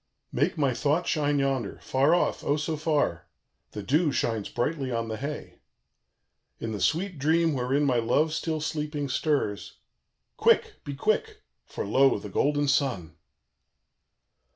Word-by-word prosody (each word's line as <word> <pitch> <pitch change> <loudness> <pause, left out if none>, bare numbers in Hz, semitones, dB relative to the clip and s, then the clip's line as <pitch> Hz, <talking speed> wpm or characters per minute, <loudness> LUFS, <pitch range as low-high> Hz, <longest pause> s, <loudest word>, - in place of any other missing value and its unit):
"Make 145 +7 0
my 140 -4 +2
thought 150 +7 +1
shine 145 -2 +1
yonder 135 -6 -1
far 140 +6 +3
off, 175 - 0
O 145 - +1
so 155 +1 -2
far! 145 - 0 0.5
The 105 - -5
dew 150 - +2
shines 115 -5 -1
brightly 135 0 -2
on 115 -1 -2
the 110 - -3
hay 145 +5 -6 1.0
"In 115 - -4
the 105 -3 -4
sweet 165 - 0
dream 160 +3 +2
wherein 135 +2 0
my 130 -4 +2
love 150 +7 +2
still 160 -1 -2
sleeping 150 -2 -3
stirs 135 -7 -1 0.6
Quick! - - +2
be 140 - -5
quick! 420 - -1 0.2
for, - - -5
lo, 135 0 +4
the - - -8
golden 145 0 +1
sun!" 125 - 0
145 Hz, 145 wpm, -27 LUFS, 125-155 Hz, 1.0 s, lo